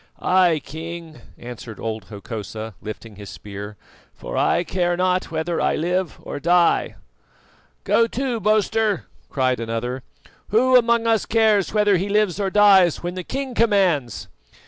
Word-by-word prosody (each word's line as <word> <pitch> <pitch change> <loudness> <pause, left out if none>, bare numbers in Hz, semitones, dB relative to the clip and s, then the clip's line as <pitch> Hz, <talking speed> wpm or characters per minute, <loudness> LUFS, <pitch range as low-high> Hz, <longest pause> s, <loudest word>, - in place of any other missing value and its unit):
"I, 180 -3 +3
King," 165 +1 -8 0.2
answered 120 -2 -9
old 110 -3 -4
Hokosa, 110 +1 -7
lifting 110 -1 -9
his 100 -1 -9
spear, 105 +1 -9 0.4
"for - - -7
I - - +2
care 175 0 -1
not 185 0 0
whether 165 +1 -2
I - - +1
live 180 +1 -1
or - - -6
die." 170 +2 +2 0.9
"Go 230 - +3
to, 250 0 -2
boaster!" 215 - +1 0.2
cried 130 -2 0
another. 115 +3 -3 0.5
"Who 255 +5 +3
among 235 -1 +4
us 225 -2 +1
cares 220 -4 +2
whether 210 -2 +3
he 195 +3 -3
lives 210 -2 +1
or 195 -1 0
dies 195 -5 +5
when 175 0 -3
the 185 0 -5
king 270 +5 -4
commands?" 190 - +1
175 Hz, 145 wpm, -22 LUFS, -, 0.9 s, dies